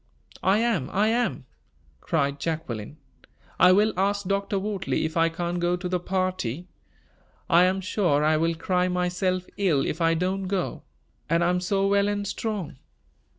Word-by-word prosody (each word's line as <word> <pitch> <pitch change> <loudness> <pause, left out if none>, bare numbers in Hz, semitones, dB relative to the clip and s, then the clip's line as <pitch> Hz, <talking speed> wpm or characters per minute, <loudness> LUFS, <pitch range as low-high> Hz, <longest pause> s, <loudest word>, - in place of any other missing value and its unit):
"I 190 +2 +3
am! 225 - 0
I 210 +3 +2
am!" 240 +2 -1 0.5
cried 140 -3 -1
Jacqueline. 145 -7 -4 0.6
"I 180 - +7
will 210 +3 +4
ask 200 +2 0
Dr. 200 +1 -1
Wortley 195 -4 -2
if 160 - -4
I 165 0 +3
can't 175 +1 -3
go 175 +1 +1
to 180 0 -5
the 180 0 -1
party. 185 -5 -2 0.8
I 175 +2 +5
am 190 +1 0
sure 180 -6 +1
I 155 +1 +3
will 165 +2 +1
cry 180 +2 0
myself 180 0 -1
ill 170 -9 +2
if 165 - -3
I 165 0 +3
don't 185 +3 -1
go; 190 -2 -2 0.5
and 165 +1 +2
I 175 - +3
am 180 - +1
so 195 +2 0
well 200 0 +3
and 205 0 -1
strong." 195 - -4
180 Hz, 165 wpm, -25 LUFS, 165-195 Hz, 0.8 s, I